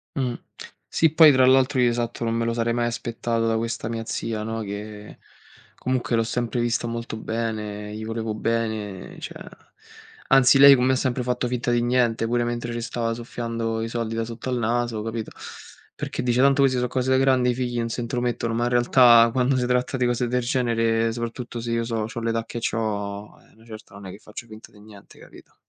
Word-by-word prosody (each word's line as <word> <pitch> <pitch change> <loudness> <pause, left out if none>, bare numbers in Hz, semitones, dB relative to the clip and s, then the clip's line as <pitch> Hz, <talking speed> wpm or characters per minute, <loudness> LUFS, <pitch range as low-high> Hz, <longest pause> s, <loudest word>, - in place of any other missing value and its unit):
Mh. 130 -3 -1 0.6
Sì, 160 -2 +3
poi 160 -2 +8
tra 130 -2 +4
l'altro 130 +1 +4
io, 125 -1 +4
esatto, 120 0 -3
non 115 - 0
me 115 0 0
lo 115 - 0
sarei 115 0 0
mai 120 0 0
aspettato 115 -1 -2
da 115 - +1
questa 115 0 -3
mia 115 0 -4
zia 110 -1 -3
no, 115 +1 -4
che 105 0 -8 0.6
comunque 125 -2 -1
l'ho 115 - +2
sempre 120 +2 -2
vista 120 -1 0
molto 115 -1 -4
bene, 105 -2 -4
gli 110 - -6
volevo 110 0 -3
bene, 110 -4 -3
cioè, - - -6 0.9
anzi, 135 0 +6
lei 140 0 +10
con 125 - 0
me 130 +1 +3
ha - - +2
sempre 130 -1 -1
fatto 125 0 -1
finta 120 0 -1
di 120 0 +2
niente, 120 -2 +1
pure 120 +1 0
mentre 120 0 -3
ce 120 - -4
stava 115 -1 -2
soffiando 115 -1 -4
i 115 - -2
soldi 115 -1 -3
da 115 0 -1
sotto 120 +2 -7
al 125 - 0
naso, 120 -1 -1
capito? 115 0 -5 0.6
Perché - - -4
dice 125 0 +2
tanto 140 +1 +4
queste 130 -2 +2
so 125 - 0
cose 130 +1 -1
da 130 - +4
grandi, 130 -2 +3
i - - -1
figli 120 -1 -3
non 115 -1 -1
se 115 +1 -4
intromettono, 120 -1 -2
ma 120 +1 0
in - - +1
realtà 120 -1 +6
quando 130 +2 +1
se 125 -1 0
tratta 125 +1 0
di 125 -1 +1
cose 120 0 0
del 125 +1 0
genere, 115 -2 +1
soprattutto 120 0 -5
se 115 0 -4
io 115 0 0
so 115 -2 -2
c'ho 115 +1 -6
l'età 115 0 -1
che 120 - -6
c'ho, 105 -3 -3
eh - - -24
a - - -26
una 110 - -21
certa, 110 -3 -12
non 100 -1 -10
è - - -7
che 100 - -10
faccio 105 +3 -10
finta 110 -1 -13
di 105 - -17
niente, 105 -2 -16
capito? - - -16
115 Hz, 220 wpm, -24 LUFS, 115-125 Hz, 0.9 s, lei